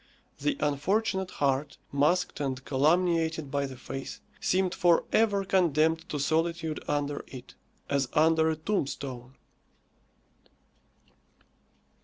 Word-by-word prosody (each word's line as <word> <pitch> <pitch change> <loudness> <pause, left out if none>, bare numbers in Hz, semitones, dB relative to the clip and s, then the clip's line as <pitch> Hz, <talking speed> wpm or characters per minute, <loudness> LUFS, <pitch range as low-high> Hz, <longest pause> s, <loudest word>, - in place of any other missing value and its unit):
The 290 -1 0
unfortunate 190 +6 0
heart, 140 -1 -1
masked 150 +6 +1
and 130 -2 -3
calumniated 160 +1 +1
by 140 0 0
the 130 -1 -9
face, 135 +2 -7 0.2
seemed 185 0 +1
for 175 -3 +3
ever 205 -3 +2
condemned 165 -3 +2
to 150 - -2
solitude 160 +2 -1
under 145 0 -1
it, 130 -2 -11 0.3
as 140 -3 0
under 160 0 +4
a 160 - 0
tombstone. 140 -7 -3
155 Hz, 105 wpm, -28 LUFS, 140-175 Hz, 0.3 s, under